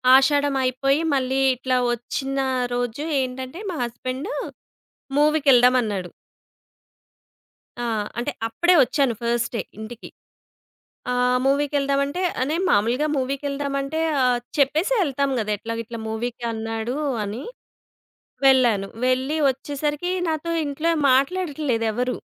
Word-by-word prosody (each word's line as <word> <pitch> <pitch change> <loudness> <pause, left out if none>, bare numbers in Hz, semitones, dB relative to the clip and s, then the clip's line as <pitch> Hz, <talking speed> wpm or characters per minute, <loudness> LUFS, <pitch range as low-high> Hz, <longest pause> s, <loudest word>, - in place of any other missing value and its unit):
ఆషాఢం 285 +1 +3
అయిపోయి 275 +4 +1
మళ్ళీ 265 0 +1 0.2
ఇట్లా 255 0 0
వచ్చిన 270 +3 -3 0.3
రోజు 245 +3 -2 0.2
ఏంటంటే 260 +5 -5
మా 340 - -4
హస్బాండు 255 - -4 0.8
మూవీకేళ్దాం 275 -5 +5
అన్నాడు. 190 -5 -3 1.7
ఆ! - - -1 0.3
అంటే 240 - -1 0.2
అప్పుడే 345 +9 +2
వచ్చాను 270 -2 +1
ఫస్ట్ 235 0 0
డే - - 0 0.2
ఇంటికి. 225 +2 -8 1.0
ఆహ్, 250 0 +2
మూవీకేళ్దాం 280 0 +1
అంటే 335 +6 -4 0.3
నేను 335 +4 0
మామూలుగా 235 +9 +2
మూవీకేళ్దామంటే 275 +2 -2 0.2
ఆహ్, 250 -1 +3 0.2
చెప్పేసి 310 - +2
యేళ్తాం 280 -5 0
కదా! 215 -1 -2
ఎట్లా 230 +2 -5
ఇట్లా 230 0 -8
మూవీకి 235 +2 -4
అన్నాడు 225 +3 -3 0.3
అని, 210 +6 -5 1.0
వెళ్ళాను. 240 -7 +4 0.2
వెళ్ళి 260 +4 +1
వచ్చేసరికి 295 +5 -2 0.2
నాతో 320 +1 -2
ఇంట్లో 305 +4 -1 0.2
మాట్లాడట్లేదు 275 -4 +1
ఎవరు. 250 +3 -1
265 Hz, 110 wpm, -23 LUFS, 240-290 Hz, 1.7 s, మూవీకేళ్దాం